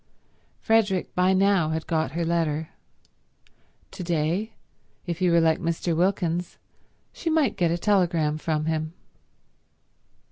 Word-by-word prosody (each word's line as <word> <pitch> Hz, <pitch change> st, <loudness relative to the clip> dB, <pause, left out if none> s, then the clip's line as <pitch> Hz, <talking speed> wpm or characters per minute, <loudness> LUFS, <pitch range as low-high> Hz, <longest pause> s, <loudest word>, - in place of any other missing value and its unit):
Frederick 210 Hz, -5 st, +1 dB
by 180 Hz, +1 st, +3 dB
now 190 Hz, -4 st, +3 dB
had 160 Hz, 0 st, -3 dB
got 160 Hz, -3 st, -1 dB
her 170 Hz, +1 st, -1 dB
letter. 160 Hz, -2 st, -1 dB, 1.2 s
To -, -, -7 dB
day, 170 Hz, +6 st, -1 dB, 0.5 s
if 170 Hz, -2 st, -4 dB
he 180 Hz, -1 st, +2 dB
were 170 Hz, 0 st, +4 dB
like 160 Hz, -1 st, +2 dB
Mr. 170 Hz, 0 st, -1 dB
Wilkins, 175 Hz, -1 st, 0 dB, 0.6 s
she 330 Hz, -, -3 dB
might 315 Hz, -4 st, +2 dB
get 175 Hz, -2 st, +1 dB
a 170 Hz, -, 0 dB
telegram 170 Hz, -6 st, +1 dB
from 155 Hz, -1 st, -1 dB
him. 155 Hz, 0 st, -2 dB
170 Hz, 130 wpm, -25 LUFS, 160-185 Hz, 1.2 s, were